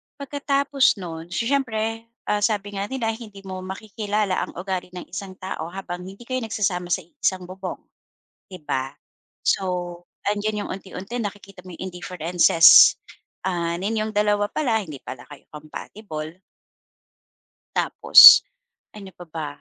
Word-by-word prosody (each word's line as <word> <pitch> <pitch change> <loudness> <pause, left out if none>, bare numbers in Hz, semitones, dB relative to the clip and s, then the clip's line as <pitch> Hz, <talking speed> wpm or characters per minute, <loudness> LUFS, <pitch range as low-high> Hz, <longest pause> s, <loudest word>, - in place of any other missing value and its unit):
pagkatapos 280 -1 +1
no'n 165 -4 -8
so, 175 +6 -2
siyempre, 225 -4 -1 0.2
ah, 210 - 0
sabi 205 -1 -1
nga 200 +1 -3
nila, 240 -4 -2
hindi 210 -4 -10
mo 185 -1 -6
makikilala 205 +1 -3
ang - - -13
ugali 185 0 -4
ng 180 - -9
isang 190 -2 -7
tao 185 -3 -6
habang 180 0 -7
hindi 195 +5 -11
kayo 255 +2 -3
nagsasama 200 -6 -2
sa 180 +1 -1
iisang 185 +2 -2
bubong, 185 +1 -7 0.6
'di 185 -6 -12
ba? 135 -2 -3 0.5
So, 195 - +1 0.7
'andiyan 210 0 -2
yung - - -9
unti-unti 195 +4 -7
nakikita 200 -3 -7
mo 180 - -9
yung 190 +3 -6
indifferences, 175 -2 +6 0.5
ah, 170 -2 -1
ninyong 215 +1 -2
2 205 0 +2
pala, 240 -6 0
hindi 145 -4 -10
pala 125 - -9
kayo 145 -2 -14
compatible. 155 +2 -8 1.4
Tapos, - - +9 0.5
ano 200 -2 -11
pa 175 - -11
ba, 160 -1 -5
195 Hz, 140 wpm, -23 LUFS, 180-215 Hz, 1.4 s, Tapos